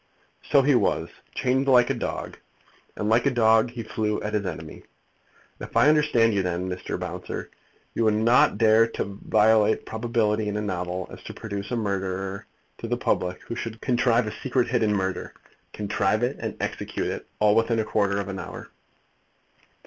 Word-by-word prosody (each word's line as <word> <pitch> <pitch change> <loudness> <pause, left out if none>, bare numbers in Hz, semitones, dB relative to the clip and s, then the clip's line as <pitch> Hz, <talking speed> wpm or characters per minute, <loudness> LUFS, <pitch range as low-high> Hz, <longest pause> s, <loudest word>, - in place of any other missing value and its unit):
"So 140 - +5
he 145 +1 +4
was; 125 - +1 0.3
chained 130 +2 +1
like 125 -2 +5
a - - +1
dog; - - -5 0.6
and 105 - -3
like 115 +5 +3
a - - +5
dog 115 -2 +4
he 120 -1 -6
flew 105 -1 -2
at 105 - -3
his 105 -2 0
enemy. 80 -3 -7 0.8
If - - -5
I 150 - +6
understand 145 -7 +3
you, 100 - +2
then, 90 0 -2
Mr. 90 0 -4
Bouncer, 90 0 -6 0.4
you 115 - 0
would 110 -1 +3
not 115 0 +4
dare 110 0 +5
so - - -14
to 100 +1 -9
violate 110 0 +3
probability 110 -2 0
in 105 0 -2
a - - -1
novel, 90 -2 -3
as - - -10
to - - -8
produce 100 -2 -5
a 125 - -1
murderer 95 -2 -3 0.3
to - - -5
the - - -1
public 90 0 -1
who - - -6
should 115 -1 -5
contrive 120 -2 +2
a 105 - -4
secret 130 -2 0
hidden 115 -3 +2
murder, 95 -2 -2 0.4
contrive 105 +2 0
it 125 +3 -1
and - - -5
execute - - -3
it, - - -4
all 105 -1 +4
within 115 +1 +2
a 110 - 0
quarter 100 -2 +1
of 100 - -3
an 95 -1 -5
hour?" - - -8
110 Hz, 185 wpm, -25 LUFS, 100-120 Hz, 0.8 s, I